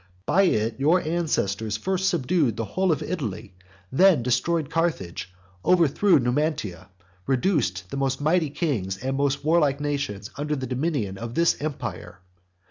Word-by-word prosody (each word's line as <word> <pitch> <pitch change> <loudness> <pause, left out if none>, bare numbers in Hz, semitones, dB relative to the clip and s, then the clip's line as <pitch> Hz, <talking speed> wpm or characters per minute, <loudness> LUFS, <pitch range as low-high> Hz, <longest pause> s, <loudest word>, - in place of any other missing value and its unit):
By 195 +2 +4
it 110 +4 -1
your 155 +6 +4
ancestors 110 - -1
first 190 - 0
subdued 145 - +1
the 115 - -2
whole 185 - 0
of 150 - -1
Italy; 110 - -4 0.4
then 175 -2 +5
destroyed 145 +5 0
Carthage, 100 - -2 0.3
overthrew 180 +2 +4
Numantia, 125 - -1
and 90 -1 -34 0.2
reduced 125 - 0
the - - -3
most 135 -1 0
mighty 155 +1 +2
kings 120 - -2
and 130 +6 -3
most 140 +1 0
warlike 150 -4 +3
nations 140 -8 -3
under 150 +1 -1
the 130 -2 -4
dominion 125 - -2
of 115 +1 -6
this 170 0 +3
empire. 145 - -5
140 Hz, 145 wpm, -25 LUFS, 115-165 Hz, 0.4 s, then